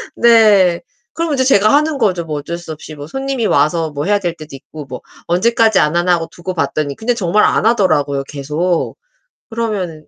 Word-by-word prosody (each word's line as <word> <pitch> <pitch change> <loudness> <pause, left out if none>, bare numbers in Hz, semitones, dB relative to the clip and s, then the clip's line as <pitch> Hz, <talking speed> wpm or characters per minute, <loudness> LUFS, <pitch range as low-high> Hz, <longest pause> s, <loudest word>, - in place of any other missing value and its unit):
네. 210 -7 +4 0.3
그러면 330 -3 -2
이제 260 - +1
제가 215 -5 +4
하는 300 +1 +2
거죠. 190 -8 0
뭐 155 -2 -4
어쩔 170 +4 -6
수 175 -2 -9
없이 155 0 -9
뭐 145 -1 -8
손님이 270 +3 -3
와서 160 -4 +1
뭐 145 +2 -4
해야 205 +1 +2
될 175 -4 -3
때도 155 -3 -11
있고 145 +2 -11
뭐 130 -1 -8 0.3
언제까지 220 +4 +2
안 150 +2 +1
하나 175 +1 +2
하고 165 -1 -1
두고 185 +2 -6
봤더니 150 -3 -2
그런데 240 +2 -1
정말 210 -1 +1
안 - - +2
하더라고요, 150 -11 +1
계속. 150 +5 -2 0.6
그러면 200 -9 -4
180 Hz, 375 characters per minute, -16 LUFS, 155-225 Hz, 0.6 s, 네